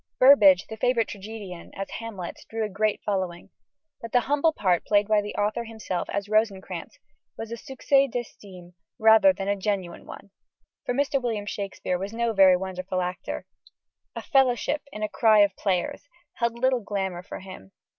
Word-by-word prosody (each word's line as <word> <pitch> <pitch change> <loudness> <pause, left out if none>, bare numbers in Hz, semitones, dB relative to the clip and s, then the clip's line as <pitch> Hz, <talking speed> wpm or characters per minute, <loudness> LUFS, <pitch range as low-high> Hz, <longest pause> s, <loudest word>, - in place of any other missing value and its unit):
Burbage, 210 -9 +7
the 220 - -8
favourite 235 -1 +1
tragedian, 200 -3 -8
as 195 0 -4
Hamlet, 205 -7 -7
drew 225 0 -2
a - - -5
great 210 +2 -1
following: 190 -3 -3 0.5
but 230 - -7
the 245 - +4
humble 290 +5 +2
part 185 - +1
played 205 -1 +2
by 215 -1 +3
the 205 - -7
author 210 +3 -1
himself 220 -5 -4
as 200 0 -3
Rosencrantz 215 -2 -1 0.4
was 225 0 -7
a - - -3
succès 270 +3 +1
d'estime 190 -7 -8 0.2
rather 220 +6 +6
than 195 -8 -5
a 200 - +1
genuine 190 -3 -3
one 200 - -11 0.5
for 245 - -1
Mr. 280 0 +1
William 225 -4 -2
Shakespeare 195 -3 -3
was 195 +3 -5
no 235 0 0
very 190 -2 +6
wonderful 185 0 -4
actor. 180 0 -4 0.7
"A - - -5
fellowship 270 0 +2
in 215 - -6
a - - +1
cry 215 0 +4
of 200 -1 +3
players" 190 +8 -2 0.2
held 235 -1 -1
little 255 0 +1
glamour 190 -4 -3
for 185 - -9
him. 185 - -11
210 Hz, 170 wpm, -25 LUFS, 190-235 Hz, 0.7 s, Burbage